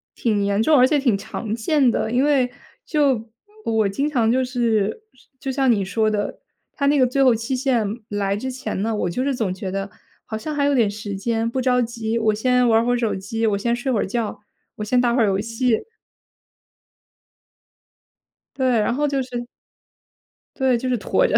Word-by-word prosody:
挺 210 -4 0
严 200 +2 +1
重， 305 +1 +5
而 255 +1 +6
且 300 - +2
挺 245 -8 +2
常 210 +2 -5
见 255 +2 +2
的。 220 - -1
因 250 +3 +2
为 275 -4 +3 0.4
就 270 -7 +1 0.4
我 220 -3 +2
经 280 +10 -1
常 230 -5 +2
就 260 +1 +2
是 235 - 0 0.3
就 270 0 -4
像 265 -1 +1
你 210 -4 +3
说 215 +3 +1
的， 205 -1 -2 0.3
它 280 - -2
那 290 +1 +4
个 255 - +5
最 270 +2 0
后 255 -3 +5
期 230 +4 -2
限 250 -4 +1 0.2
来 200 -1 -1
之 260 +4 -4
前 255 -6 -4
呢， 220 0 -1
我 180 - -1
就 180 - -2
是 275 -2 0
总 205 -6 -1
觉 190 0 -5
得 195 +1 -4 0.3
好 220 - -5
像 300 +6 -5
还 285 - +1
有 285 0 +3
点 230 -6 +3
时 205 0 -6
间， 225 +2 -1
不 260 - -2
着 250 -1 +2
急， 230 -1 -2
我 220 -1 +2
先 250 +3 +2
玩 225 +1 +4
会 245 - +2
儿 - - +1
手 230 -2 0
机， 225 +4 -3
我 205 -2 +1
先 235 +4 0
睡 250 +2 -2
会 220 - +1
儿 - - 0
觉， 225 +1 -3 0.4
我 210 - -5
先 245 +4 +2
打 240 -1 +2
会 250 - +2
儿 - - +5
游 195 -1 +1
戏。 230 +1 0 2.7
对， 255 -4 +2
然 210 +3 +1
后 295 +1 +1
就 275 -1 0
是 240 -1 -6 1.1
对， 260 -3 +2
就 255 +2 -4
是 250 - +1
拖 - - +1
着。 - - 0
235 Hz, 220 characters per minute, -22 LUFS, 215-260 Hz, 2.7 s, 而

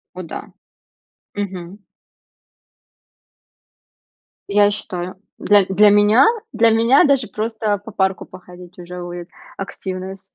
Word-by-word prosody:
О 185 - -6
да, 165 - -9 0.8
мгм. 190 -1 -6 2.7
Я 205 0 +4
считаю, 185 -3 -5 0.2
для 205 -2 +4
для 205 +3 +4
меня, 205 +5 +5 0.3
для 230 0 +4
меня 230 +4 +4
даже 275 -5 +2
просто 215 -1 -2
по 215 +2 -11
парку 190 -1 -1
походить, 180 -1 -14
уже 180 0 -8
будет 175 0 -8 0.3
активность. 190 -1 -6
195 Hz, 105 wpm, -19 LUFS, 180-215 Hz, 2.7 s, меня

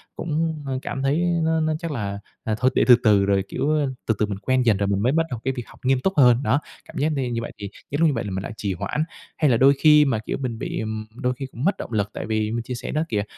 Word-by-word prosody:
cũng, 160 -1 -2
ơ, 130 -1 -2
cảm 135 - -4
thấy 140 +2 +2 0.3
nó 160 0 +2
nó 155 0 +1
chắc 165 -1 -4
là, 100 -7 -3 0.2
à, 110 -1 -1
thôi 130 +1 +3
để - - +4
từ 125 - +10
từ 105 -3 +4
rồi, 100 -1 +2
kiểu, 150 +2 0
a, 145 - +1 0.2
từ 110 - +3
từ 105 - +3
mình 100 -2 -4
quen 130 +5 +1
dần 110 -4 +4
rồi 100 0 0
mình 100 -1 +1
mới 125 +5 +2
bắt 165 +2 +2
đầu 125 - -4
cái 135 - 0
việc 120 - -3
học - - -17
nghiêm 130 0 +3
túc 190 +7 0
hơn, 125 -1 +5
đó. 140 - +2 0.3
Cảm - - -11
giác 150 +3 +1
đi 135 -4 -1
như 115 -1 -2
vậy 115 - -6
thì 100 - -6 0.2
những 145 - -1
lúc 165 - +6
như 150 - +2
vậy 115 -2 -2
là 100 - -5
mình 95 +1 -3
lại - - -6
trì 100 -2 -2
hoãn. 100 - -2 0.3
Hay 150 -4 +3
là 115 - +4
đôi 135 +4 +6
khi 150 -1 +7
mà, 115 -5 0
kiểu, 110 - -4
mình 120 -4 -3
bị, - - -3
ừm, 110 0 -4
đôi 125 +1 -1
khi 135 +2 -6
cũng 120 - -7
mất 195 +5 +2
động - - -7
lực 105 -2 0
tại - - -5
vì 110 -1 -1
mình 115 0 -2
chia 125 +2 -5
sẻ 120 - -6
đó 155 - 0
kìa, 105 -1 0
125 Hz, 315 wpm, -23 LUFS, 110-145 Hz, 0.3 s, từ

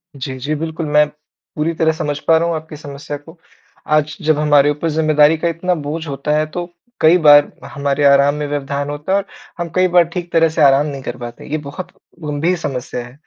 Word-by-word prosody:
जी, 130 -1 -6
जी, 145 +4 -3
बिल्कुल। 160 +1 -4
मैं 150 0 +3 0.5
पूरी 160 +2 -1
तरह 160 0 +2
समझ 145 -2 -3
पा 165 -1 +6
रहा 170 - 0
हूँ 170 - -1
आपकी 155 0 -7
समस्या 145 0 -7
को 160 +4 -16 0.6
आज 150 0 -1
जब 155 -1 +2
हमारे 145 -1 +4
ऊपर 150 +3 -1
ज़िम्मेदारी 155 0 +3
का 170 - -1
इतना 170 +2 -1
बोझ 155 +1 -5
होता 140 +1 -3
है 155 - +1
तो 175 -1 -4 0.4
कई 165 +3 +6
बार 145 0 +7 0.2
हमारे 140 0 -1
आराम 140 0 +5
में 150 0 -3
व्यवधान 140 0 -3
होता 145 +5 -5
है 195 - +4
और 200 - -2 0.3
हम 170 - -3
कई 185 0 +4
बार 175 -1 +5
ठीक 175 -2 -5
तरह 165 -1 +4
से 160 0 -2
आराम 140 0 +5
नहीं 140 -3 -5
कर - - -5
पाते, 120 -1 -9
ये 155 - 0
बहुत 150 +5 -8 0.3
गंभीर 150 +4 0
समस्या 125 -5 -4
है। 120 - -14
150 Hz, 215 wpm, -17 LUFS, 145-165 Hz, 0.6 s, बार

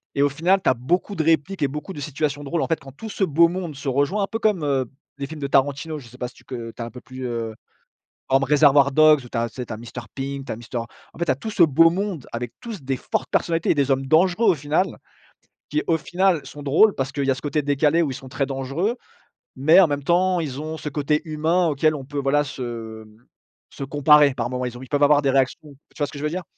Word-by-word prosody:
et 140 - +1
au 145 - +4
final 175 +7 +2
tu - - +3
as - - +4
beaucoup 175 - -1
de 160 - 0
répliques 165 +4 +1
et 140 - +3
beaucoup 150 +7 -6
de 145 - -8
situations 145 0 -2
drôle. 165 +4 -2
En - - -1
fait 165 - 0
quand 135 -1 -12
tout 220 +9 -8
ce 200 - -2
beau 170 0 +4
monde 175 -3 -5
se 135 0 -4
rejoint 145 +10 +1
un - - -1
peu 225 - -3
comme, 210 -8 +1
heu, 135 -3 +1 0.3
les 140 - -4
films 155 0 -9
de 140 - -1
Tarantino. 145 +3 +1
Je 120 - -13
sais 125 +2 -15
pas 125 - -2
si 125 - -15
tu - - -19
co 130 - -10
heu, 115 -1 -6
tu - - -8
as - - -3
un 115 - -8
peu 125 - -11
plus, 130 0 -8
heu, 115 -2 -4 0.7
comme 135 +1 +3
Reservoir 145 -1 +5
Dogs 155 -2 +6
ou 120 - -12
tu 115 - -4
as 115 0 0
tu 125 +3 -6
as 110 - -6
Mister 120 +2 -8
Pink 135 0 -4
tu - - -4
as - - -3
Mister 120 +2 -7
en 115 0 -3 0.3
fait 170 - 0
tu 145 - +2
as - - +1
tout 220 - -6
ce 180 - +4
beau 165 +2 +6
monde 180 - -3
avec 120 0 -5
tous 220 -9 -7
des 135 0 -2
fortes - - -3
personnalités 165 -1 +1
et - - +2
des 140 -1 +1
hommes 135 0 +1
dangereux 180 - +4
au - - 0
final. 150 +6 -1 0.7
Qui 150 +1 0
au 165 - +3
final 175 0 0
sont 145 - -10
drôles 165 +10 +4
parce 135 +1 -3
qu'il 140 0 -2
y 135 - +2
a 135 - +2
ce 130 - -9
côté 150 0 -1
décalé 145 +4 +2
où 150 - -1
ils - - -4
sont 130 - -10
très 135 +2 -1
dangereux. 140 - -2 0.6
Mais 155 +7 +6
en 175 - +5
même 145 -1 -3
temps 180 +3 +2
ils 145 -4 -4
ont 155 +1 -5
ce 155 - -7
côté 150 +1 0
humain 160 +3 +1
auquel 155 +1 +2
on 135 - -7
peut 145 +2 -7
voilà 140 +2 +2
se 115 -4 -7 0.6
se - - -8
comparer 145 0 +5
par 120 -1 -3
moments 125 0 -3
ils 125 +1 -7
peuvent 145 0 +1
avoir 145 0 +5
des 140 - +1
réactions 135 +2 0 0.2
tu - - -14
vois 145 - +1
ce - - -11
que 145 - -7
je 145 - -6
veux 150 - 0
dire? 180 +2 -4
145 Hz, 275 wpm, -23 LUFS, 135-165 Hz, 0.7 s, Dogs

